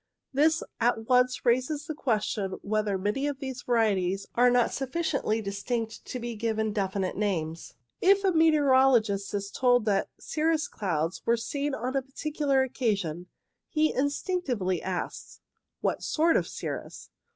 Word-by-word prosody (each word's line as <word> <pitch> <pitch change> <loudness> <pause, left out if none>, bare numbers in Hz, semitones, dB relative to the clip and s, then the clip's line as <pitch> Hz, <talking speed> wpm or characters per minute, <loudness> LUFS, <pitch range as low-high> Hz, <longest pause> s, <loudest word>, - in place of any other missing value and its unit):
This 310 +4 +3 0.2
at 225 -1 +1
once 250 0 +3
raises 255 +5 +1
the 310 - -4
question 215 -8 -1
whether 210 -1 0
many 210 +9 -1
of 285 -2 -2
these 265 -2 -6
varieties 195 -5 +1
are 245 +1 +5
not 245 -1 +2
sufficiently 270 -5 -1
distinct 220 +3 -3
to - - -5
be 235 -1 -5
given 220 -1 -1
definite 195 -2 -1
names. 170 -6 -2 0.3
If 395 +1 +5
a 385 - +3
meteorologist 265 - +4
is 200 0 -3
told 245 -3 +3
that 200 -2 +1
cirrus 315 0 0
clouds 165 -4 -2
were 235 0 +2
seen 280 +4 -2
on 255 +3 -3
a 270 - +2
particular 275 0 0
occa 240 -5 0
sion, 175 -1 -5 0.4
he 310 -1 +2
instinctively 265 - -1
asks 185 -1 -5 0.2
— - - -58
What - - 0
sort 325 +1 +2
of - - +2
cirrus - - -6
240 Hz, 150 wpm, -28 LUFS, 200-280 Hz, 0.4 s, are